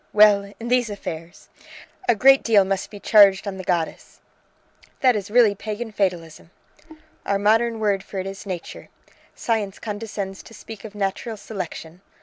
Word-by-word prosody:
"Well, 205 -1 +5
in 235 +1 -6
these 245 -2 +2
affairs! 170 -3 -8 0.6
A 240 - +5
great 270 +5 +6
deal 210 -4 +4
must 195 0 -2
be 205 - -10
charged 200 -2 +5
on 195 -1 -4
the 185 - -7
goddess." 170 -3 -3 0.8
"That 255 -3 +4
is 200 -1 -4
really 225 -2 +5
Pagan 215 +3 -6
fatalism!" 175 -6 -3 0.7
"Our 200 - 0
modern 225 +3 +2
word 205 -3 +1
for 195 - -9
it 190 - -3
is 195 +1 -8
Nature. 180 -3 -7 0.5
Science 210 -4 -2
condescends 205 -3 -6
to 225 - -15
speak 225 -1 -11
of 210 -1 -10
natural 205 +3 -3
selection. 180 -4 -7
205 Hz, 155 wpm, -22 LUFS, 195-220 Hz, 0.8 s, great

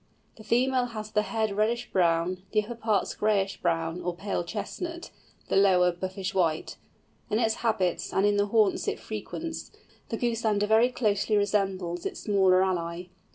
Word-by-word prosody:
The 220 - -12
female 250 +3 +2
has 215 -3 -7
the 210 - +2
head 220 -1 -1
reddish 230 +3 0
brown, 175 0 +1
the 215 -1 +3
upper 230 +3 -6
parts 220 -3 0
grayish 200 -2 0
brown 165 +1 -1
or 175 0 -3
pale 195 -1 -2
chestnut, 330 - -5 0.4
the - - -1
lower 185 -2 +5
buffish 185 +2 -4
white. 165 -5 0 0.5
In 210 - +1
its 225 -1 +1
habits 215 -7 0
and 195 - +2
in 205 0 +3
the 205 0 +2
haunts 210 -2 +2
it - - 0
frequents, 315 +10 -6 0.4
the 225 - -2
Goosander 220 -4 +1
very 220 +3 +4
closely 210 -3 +1
resembles 190 -4 0
its - - -7
smaller 190 -3 +4
ally. 175 -1 -2
205 Hz, 160 wpm, -27 LUFS, 185-220 Hz, 0.5 s, lower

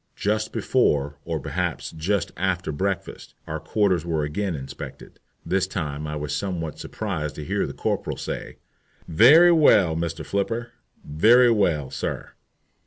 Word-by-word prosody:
Just 110 +1 -1
before, 70 0 +1
or 80 -2 -2
perhaps - - -3
just 95 +5 -1
after 90 -1 -1
breakfast, 95 +5 -4
our 80 0 -4
quarters 90 +2 +1
were 80 -3 -1
again 85 +5 -2
inspected. 65 -2 -9 0.3
This 95 0 +1
time 75 -6 -4
I 75 - -4
was 75 0 -3
somewhat 85 -6 -4
surprised 85 -9 -4
to 75 - -7
hear - - -1
the - - -7
corporal - - -2
say, - - -6 0.5
"Very 145 - +7
well, 105 - +5
Mr. 80 -1 -3
Flipper, 115 +6 -2 0.3
very 115 +12 +5
well, 85 - +1
sir." - - -4
85 Hz, 140 wpm, -24 LUFS, 75-105 Hz, 0.5 s, Very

